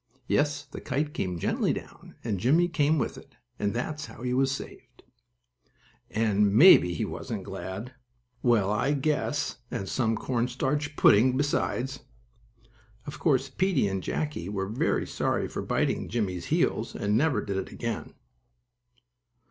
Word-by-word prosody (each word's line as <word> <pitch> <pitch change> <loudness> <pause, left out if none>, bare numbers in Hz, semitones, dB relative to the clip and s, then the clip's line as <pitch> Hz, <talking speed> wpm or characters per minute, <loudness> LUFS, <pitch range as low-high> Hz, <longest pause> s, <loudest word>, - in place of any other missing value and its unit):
Yes, 145 +2 +1
the 140 - -9
kite 145 +3 -2
came 90 -2 -2
gently - - 0
down, - - -10
and 105 -5 -2
Jimmie 155 - +4
came 155 -1 +2
with 135 - -2
it, - - -19 0.2
and 100 - 0
that's 150 +6 -3
how - - -11
he 125 0 -1
was 135 +1 +2
saved! 130 -2 -8 1.1
And, 105 -2 +2
maybe 115 - +8
he - - -1
wasn't - - -5
glad! 105 +7 -6 0.5
Well, 110 -5 +3
I 120 +7 +1
just 140 - -2
guess, 145 -1 0
and 95 - -4
some 115 +1 0
cornstarch 130 +5 -1
pudding 125 +3 +5
besides! 135 -2 -1 1.1
Of 145 - -7
course 135 -4 +2
Peetie 180 - +1
and 95 -1 -2
Jackie 145 - -3
were 100 -1 -2
very 110 +5 0
sorry - - -1
for - - -5
biting - - -1
Jimmie's 95 -7 -2
heels - - 0
and 105 +1 0
never 145 +4 +2
did 100 -1 -3
it 95 - -4
again. 115 -2 -5
125 Hz, 150 wpm, -27 LUFS, 105-145 Hz, 1.1 s, maybe